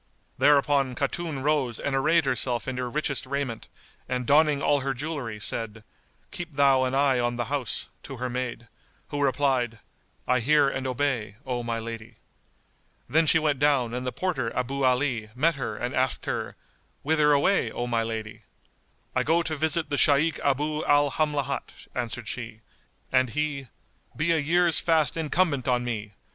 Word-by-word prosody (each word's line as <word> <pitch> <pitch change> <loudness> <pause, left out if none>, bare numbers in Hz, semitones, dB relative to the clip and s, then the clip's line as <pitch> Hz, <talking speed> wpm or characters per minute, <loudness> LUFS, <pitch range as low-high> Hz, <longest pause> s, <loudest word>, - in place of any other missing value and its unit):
Thereupon 140 -2 +3
Khatun 145 +1 -3
rose 140 -6 0
and 140 - -1
arrayed 155 +4 +3
herself 125 -1 0
in 130 -1 -3
her 125 -1 -2
richest 140 -1 -2
raiment, 135 -4 -3 0.4
and 125 -1 -1
donning 150 +1 +4
all 145 +1 +2
her 135 -1 -2
jewellery 135 -6 -4
said, 115 0 -4 0.5
"Keep 175 -3 -7
thou 135 -2 +4
an 130 +1 -1
eye 135 -2 +3
on 120 0 0
the 120 0 -2
house," 130 -7 -1
to 135 - -8
her 125 +1 -2
maid, 125 -1 -4 0.4
who 145 -1 -3
replied, 130 -4 +1 0.5
"I 125 0 +3
hear 145 +4 +4
and 130 -1 -2
obey, 125 -5 -1
O 125 -2 -2
my 115 -1 -2
lady." 115 0 -7 0.9
Then 160 +5 +3
she 160 - +6
went 150 -4 +1
down 135 -5 +2
and 125 +1 -3
the 125 - -2
porter 135 -11 -2
Abu 135 +2 -1
Ali 125 -4 +1
met 160 +6 +3
her 135 -3 -4
and 125 +1 -3
asked 130 +1 0
her, - - -3 0.5
"Whither 150 0 +3
away, 145 +8 +3
O 120 - -3
my 120 -2 0
lady?" 110 -1 -5 0.7
"I - - +3
go 165 +2 +2
to 160 -1 -3
visit 160 +2 0
the 145 - +1
Shaykh 150 +3 +3
Abu 150 +2 0
al 145 -1 +4
Hamlat;" 150 -2 -2
answered 120 -1 -3
she; 110 -2 -6 0.5
and 130 -1 +3
he, 145 0 -2 0.5
"Be 155 +3 +1
a 165 - +3
year's 170 +3 +3
fast 160 -3 +2
incumbent 160 -4 0
on 125 -1 +2
me! 105 -4 -4
135 Hz, 170 wpm, -26 LUFS, 120-150 Hz, 0.9 s, she